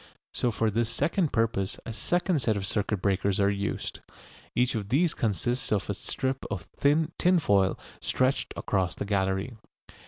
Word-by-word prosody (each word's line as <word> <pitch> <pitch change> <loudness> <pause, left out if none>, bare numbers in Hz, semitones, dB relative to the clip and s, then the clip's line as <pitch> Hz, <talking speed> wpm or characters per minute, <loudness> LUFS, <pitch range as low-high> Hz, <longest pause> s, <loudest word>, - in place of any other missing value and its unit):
So 125 - +1
for 110 -1 0
this 115 +2 +1
second 155 - +1
purpose 110 -5 0
a 115 - -5
second 175 - +1
set 110 -3 +1
of 100 - -2
circuit 100 -1 -1
breakers 100 0 +1
are 100 0 +4
used. 100 0 -3 0.6
Each 125 +1 +2
of 105 -4 -3
these 155 +7 +3
consists 120 +3 -1
of 105 -1 +1
a - - 0
strip 130 +6 -2
of - - -3
thin 155 +3 +1
tinfoil 100 - +3 0.2
stretched 130 +2 0
across 95 -4 0
the - - -4
gallery. 95 +2 0
110 Hz, 160 wpm, -28 LUFS, 100-130 Hz, 0.6 s, are